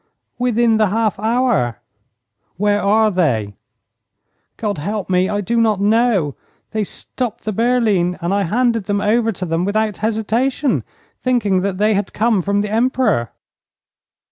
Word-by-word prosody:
'Within 235 -2 +2
the 215 -1 +3
half 215 0 0
hour.' 220 - +1 0.8
'Where 205 +1 +1
are 215 +2 +3
they?' 120 - 0 1.0
'God 205 -6 -2
help 200 +4 -3
me, 185 +1 +2
I 205 0 -1
do 230 +4 0
not 215 -3 +2
know. 205 - +2 0.4
They 215 -1 -1
stopped 235 +3 -5
the 215 - -2
berline, 215 -6 +1
and 175 +2 -1
I 200 - +1
handed 230 +2 +1
them 205 +1 0
over 225 +2 +2
to 185 -3 -5
them 165 0 -1
without 210 +1 0
hesitation, 230 +6 0 0.4
thinking 210 -7 +1
that 195 -1 -2
they 210 +2 +2
had 200 -1 -2
come 220 -2 +2
from 200 +3 0
the 210 0 -3
Emperor.' 230 - +1
210 Hz, 145 wpm, -18 LUFS, 190-230 Hz, 1.0 s, the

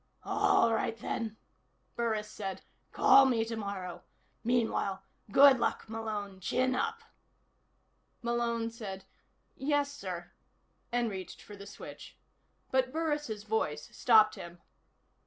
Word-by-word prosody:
"All 395 - +3
right, 225 0 -1
then," 220 0 -4 0.6
Burris 220 -3 -1
said. 195 -3 -6 0.3
"Call 270 0 +7
me 230 -3 +2
tomorrow. 200 -5 -5 0.4
Meanwhile 225 -5 0 0.3
good 275 +2 +8
luck, 230 -1 -1
Malone. 215 -3 -5
Chin 255 +7 +1
up." 455 - -2 1.2
Malone 235 -1 0
said: 195 -4 -7 0.5
"Yes, 285 0 0
sir," 180 -10 -6 0.6
and 240 -2 +1
reached 190 -1 -7
for 205 - -11
the 200 0 -11
switch. 200 - -10 0.5
But 260 -1 +2
Burris' 295 -9 -2
voice 180 -9 -2
stopped 215 -3 +6
him. 170 0 -9
225 Hz, 110 wpm, -31 LUFS, 200-255 Hz, 1.2 s, good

